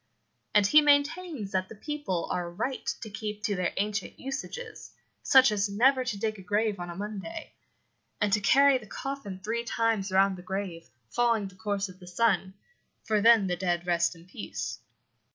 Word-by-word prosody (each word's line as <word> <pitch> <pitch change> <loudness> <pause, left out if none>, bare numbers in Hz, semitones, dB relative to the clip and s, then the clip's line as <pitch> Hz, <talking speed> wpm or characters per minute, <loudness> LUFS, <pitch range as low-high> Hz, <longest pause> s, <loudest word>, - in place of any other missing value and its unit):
And 205 -1 +6
he 300 +9 +7
maintains 290 - +1
that 185 0 -1
the - - -10
people 290 - -3
are 175 -1 -2
right 230 +9 -4
to 220 - -6
keep 210 0 -5
to 205 -1 0
their 180 -2 0
ancient 210 +2 -2
usages, 430 - -6 0.3
such 260 -3 +6
as 205 -1 0
never 255 +6 +3
to 225 -5 -3
dig 215 0 -2
a - - -9
grave 205 +1 0
on 175 0 -5
a 170 - -6
Monday, 210 - -6 0.7
and 205 -2 +1
to 210 - +4
carry 275 +5 +5
the 215 - -14
coffin 250 -7 -6
three 230 +3 -2
times 225 -4 0
round 190 0 +3
the - - -8
grave, 180 -3 -5 0.2
following 230 -4 +2
the - - -18
course 200 0 -2
of 185 0 -14
the 180 - -13
sun, 190 -1 +1 0.5
for 215 -1 +1
then 225 -2 +6
the 180 -1 0
dead 175 -1 -1
rest 170 0 +1
in 165 +1 -16
peace. 180 - -6
210 Hz, 185 wpm, -28 LUFS, 190-235 Hz, 0.7 s, he